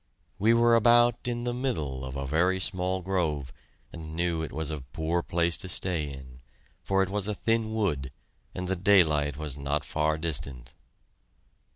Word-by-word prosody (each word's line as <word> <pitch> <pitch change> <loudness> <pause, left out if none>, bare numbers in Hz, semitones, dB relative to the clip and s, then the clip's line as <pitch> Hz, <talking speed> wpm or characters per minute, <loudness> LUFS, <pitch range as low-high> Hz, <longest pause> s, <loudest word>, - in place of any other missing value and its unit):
We 110 +4 +4
were 115 0 +5
about 120 +1 +4
in 120 -1 -2
the 120 0 -1
middle 80 - -2
of 65 +1 -6
a 70 - -3
very 90 +7 +2
small 95 -1 0
grove, 80 -8 -1 0.4
and 80 -1 -8
knew 85 -1 0
it 80 - -5
was 80 0 -3
a 75 -2 -4
poor 80 +6 -2
place 85 0 0
to 95 - -6
stay 85 -5 -2
in, 65 -2 -11 0.4
for 95 0 +2
it 95 - -3
was 105 -1 -1
a 105 - -1
thin 115 +1 0
wood, 80 -12 -1 0.4
and 90 0 -3
the 95 - 0
daylight 80 -7 +3
was 75 -3 -4
not 75 +2 -1
far 75 0 0
distant. 70 -6 -3
85 Hz, 175 wpm, -28 LUFS, 75-100 Hz, 0.4 s, were